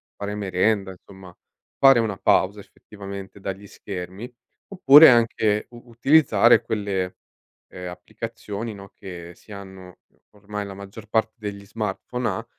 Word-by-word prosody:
fare 100 0 -5
merenda, 100 0 0
insomma, 95 -1 -15 0.4
fare 135 -3 +6
una 110 -4 -1
pausa 100 +1 +2
effettivamente 100 -1 -11
dagli 95 +1 -6
schermi. 95 +5 -8 0.4
Oppure 160 -5 +8
anche 110 -3 +2
u 120 -1 -12
utilizzare 120 -2 +4
quelle, 100 -4 -3 0.5
ehm, 90 0 -9
applicazioni, 110 +3 -7
no, 100 -1 -12
che 85 -3 -10
si - - -19
hanno 95 -2 -12 0.3
ormai, 105 0 -7
la 100 - -8
maggior 100 +3 -11
parte 110 0 0
degli 100 -2 -7
smartphone 110 +4 -4
ha, 115 - -3
100 Hz, 130 wpm, -23 LUFS, 95-115 Hz, 0.5 s, Oppure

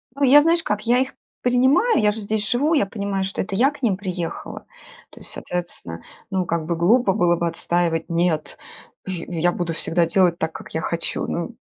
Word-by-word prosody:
А, 280 0 +2
я 285 +3 +8
знаешь 330 +2 +2
как, 210 -6 -1
я 240 +2 +3
их 260 0 -1 0.3
принимаю, 260 - +3
я 210 0 +4
же 215 - -6
здесь 210 0 -2
живу, 285 +7 +2
я 290 - +3
понимаю, 200 -1 -3
что 195 - -3
это 195 0 -4
я 265 +8 +4
к 290 - -15
ним 215 -7 +1
приехала. 180 -4 -5 0.4
То - - -15
есть, - - -7
соответственно, 170 - -5 0.3
ну 190 -1 0
как 170 -2 -2
бы 170 +1 -1
глупо 195 +5 +3
было 175 -1 +3
бы 170 0 -1
отстаивать, 170 0 0
нет, 170 -2 0 0.5
я 185 -3 -5 0.2
я - - +1
буду 175 -1 -3
всегда 170 +1 0
делать 175 0 +2
так, 160 0 -2
как - - -10
я - - -1
хочу, - - -2
ну - - -4
190 Hz, 205 wpm, -22 LUFS, 170-245 Hz, 0.5 s, я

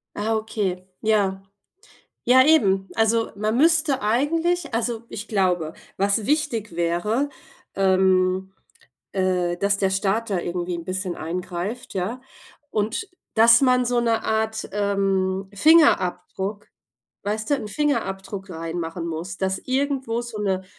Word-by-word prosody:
Ah 220 +2 0
okay. 195 -4 -2
Ja. 200 -3 +1 0.8
Ja, 260 +1 +6
eben. 195 -12 +4
Also 225 +1 +2
man 215 +3 -1
müsste 315 -2 +3
eigentlich 300 +7 0
also, 230 0 -1
ich 215 +2 -7
glaube, 180 -6 0 0.2
was 200 +2 +1
wichtig 240 - -1
wäre, 175 +11 0 0.4
ähm, 190 0 +2 0.6
äh, 180 -2 0
dass 200 +2 +1
der 195 -1 +1
Staat 200 +3 0
da 190 - +1
irgendwie 175 0 -3
'n 170 - -7
bisschen 185 0 -3
eingreift, 180 +7 -5
ja? 195 +7 -2 0.5
Und, 220 - -2 0.3
dass 230 +2 +7
man 255 -2 +4
so 245 0 +1
'ne 230 -1 0
Art, 220 0 -1
ähm, 195 -1 0
Fingerabdruck, 200 - +3 0.6
weißt 215 +3 -2
du 285 - +5
'n 215 - -5
Fingerabdruck 200 -8 -2
reinmachen 165 0 -4
muss, 170 +4 -5
dass 190 0 -1
irgendwo 265 -3 -1
so 235 -3 -7
'ne 190 -2 -1
205 Hz, 125 wpm, -23 LUFS, 185-235 Hz, 0.8 s, dass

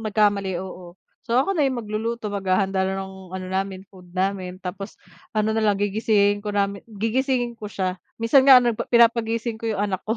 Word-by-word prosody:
nagkamali, 200 -3 +1
oo. 180 -1 -8 0.3
So, 235 0 -1
ako 275 +9 +2
na 315 - +2
yung 255 -2 -3
magluluto 220 0 -3
maghahanda 190 -1 0
na 190 0 -1
ng 190 -1 -8
ano 185 0 -5
namin, 190 0 -3
food 180 -2 -16
namin, 185 0 -2
tapos 195 +2 -7 0.4
ano 215 0 +2
na 225 - +1
lang 205 -2 +3
gigisingin 205 0 +2
ko 210 - -3
namin 200 -1 -1
gigisingin 240 +3 -1
ko 215 -2 -8
siya, 185 -2 -2 0.2
minsan 230 +4 +5
nga 270 -1 +9
ano, 240 -2 +1
pinapagising 230 0 +2
ko 230 - -2
'yong 205 -1 0
anak 190 -2 -3
ko. 220 +2 -2
205 Hz, 190 wpm, -23 LUFS, 190-230 Hz, 0.4 s, nga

